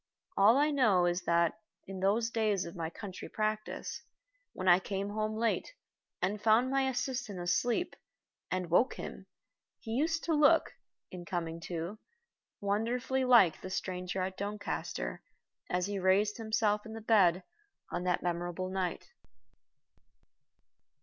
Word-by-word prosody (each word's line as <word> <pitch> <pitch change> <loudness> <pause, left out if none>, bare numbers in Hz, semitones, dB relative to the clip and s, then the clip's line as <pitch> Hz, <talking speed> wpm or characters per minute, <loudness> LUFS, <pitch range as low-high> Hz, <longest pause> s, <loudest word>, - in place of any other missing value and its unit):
All 210 +6 +6
I 295 +2 +3
know 220 -11 +4
is 175 +1 +1
that, 170 +2 +2 0.3
in 190 -1 -7
those 215 +5 +1
days 215 -5 +1
of 170 - -8
my 165 -2 -3
country 195 +1 -8
practice, 215 0 -3 0.5
when 185 - -5
I 175 0 +7
came 195 +1 -3
home 215 +1 -2
late, 230 - -1 0.5
and 200 +3 -1
found 230 +4 +4
my 270 -1 +2
assistant 250 -6 -3
asleep, 230 - 0 0.5
and 180 -2 -2
woke 230 +9 +4
him, - - -8 0.5
he 225 - -8
used 320 +7 0
to 330 - 0
look, 305 +2 +4 0.4
in 180 -1 -7
coming 170 -2 -3
to, 175 +5 -4 0.6
wonderfully 240 +6 0
like 235 -10 +5
the 185 - -6
stranger 185 0 -3
at 185 0 -4
Doncaster 200 - -4 0.5
as 180 0 0
he 200 0 -3
raised 195 +3 +2
himself 220 -2 +1
in 220 - -9
the 225 - -7
bed 195 -5 +4 0.5
on 175 - -2
that 180 -1 +1
memorable 175 +1 -2
night. 190 - -3
205 Hz, 140 wpm, -32 LUFS, 180-230 Hz, 0.6 s, I